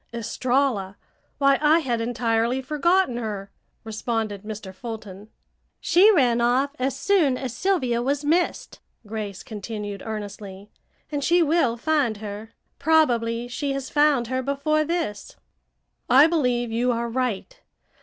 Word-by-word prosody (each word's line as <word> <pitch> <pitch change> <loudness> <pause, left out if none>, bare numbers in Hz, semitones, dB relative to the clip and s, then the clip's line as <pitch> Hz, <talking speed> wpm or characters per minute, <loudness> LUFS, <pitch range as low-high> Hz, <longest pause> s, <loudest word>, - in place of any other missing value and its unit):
"Estralla! 235 -3 -1 0.4
Why, 275 -1 +3
I 305 +2 +5
had 245 -8 -1
entirely 235 +1 0
forgotten 300 +1 +1
her," 205 -4 -5 0.3
responded 220 -2 -3
Mr. 210 -2 -8
Fulton. 210 -2 -8 0.5
"She 390 +5 +5
ran 245 - +3
off 255 +4 +2
as 265 +1 -1
soon 310 -6 +2
as 250 -3 -5
Sylvia 255 -10 0
was 280 +3 -1
missed," 340 +4 0 0.3
Grace 210 -2 -6
continued 210 -2 -6
earnestly, 205 -2 -7 0.4
"and 290 -1 -2
she 345 +4 +4
will 290 -7 +2
find 275 -5 +1
her. 210 +1 -7 0.3
Probably 240 -7 +2
she 275 +3 -3
has 275 -1 -5
found 290 -4 +3
her 260 +2 -2
before 280 +3 0
this." 320 -10 -3 0.7
"I 265 +4 +8
believe 250 -8 0
you 240 +2 +1
are 235 0 -1
right. 255 - -3
245 Hz, 130 wpm, -24 LUFS, 220-285 Hz, 0.7 s, I